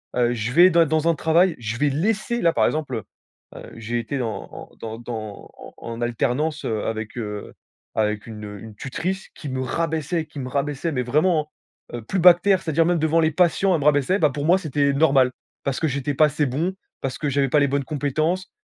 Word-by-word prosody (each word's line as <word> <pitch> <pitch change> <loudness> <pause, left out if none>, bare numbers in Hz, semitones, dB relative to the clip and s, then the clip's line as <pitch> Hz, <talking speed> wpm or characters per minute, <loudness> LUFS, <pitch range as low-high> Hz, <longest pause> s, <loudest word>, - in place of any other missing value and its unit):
Heu, 120 -1 +2
je 115 0 -3
vais 175 +4 +7
des 170 -1 +5
dans 160 +1 0
un 165 - +3
travail, 165 +3 +3
je 115 -1 -4
vais 145 +3 +2
laisser 215 - -1
là, 165 - +3
par - - +3
exemple, 150 -5 -1
heu 110 - -4 0.5
heu, - - -10
j'ai 115 +1 -3
été 130 +4 -3
en 115 -3 -4
en - - -11
dans 110 0 -6
dans 110 -4 -7
en - - -12
en 115 0 -7
alternance, 125 +6 -1
heu, 110 -2 -2
avec, 110 +1 -4
heu, 105 -3 -5 0.4
avec 105 0 -1
une, 105 -2 -8
heu, 105 -1 -8
une 110 -2 -11
tutrice 180 - -4
qui 150 - -7
me 130 0 -3
rabaissait, 160 +3 -1
qui 150 -1 -10
me 130 - -4
rabaissait, 145 +4 -2
mais 125 -2 -1
vraiment, 155 +4 +1 0.4
hein, - - -3
heu, - - -10
plus 190 - -2
bas 180 +1 +9
que 170 - -13
terre, 195 -1 +3
c'est-à-dire 165 -1 +1
même 175 0 +2
devant 160 +1 +2
les 160 -1 +3
patients, 180 +3 +2
elle 165 - 0
me - - -3
rabaissait. 150 +6 +3
Bah, 150 - +4
pour 145 +2 -4
moi, 175 +4 +5
c'était 145 -5 0
normal, 135 -3 +4 0.3
parce 135 -2 -1
que 160 - +1
j'étais 140 0 -2
pas 155 +3 +5
assez 150 0 0
bon, 155 +8 -1 0.3
parce 135 -1 -3
que 150 - -2
j'avais 140 0 +1
pas 150 - +4
les 140 - +3
bonnes 140 +1 0
compétences. 155 +6 -1
145 Hz, 230 wpm, -23 LUFS, 120-165 Hz, 0.5 s, bas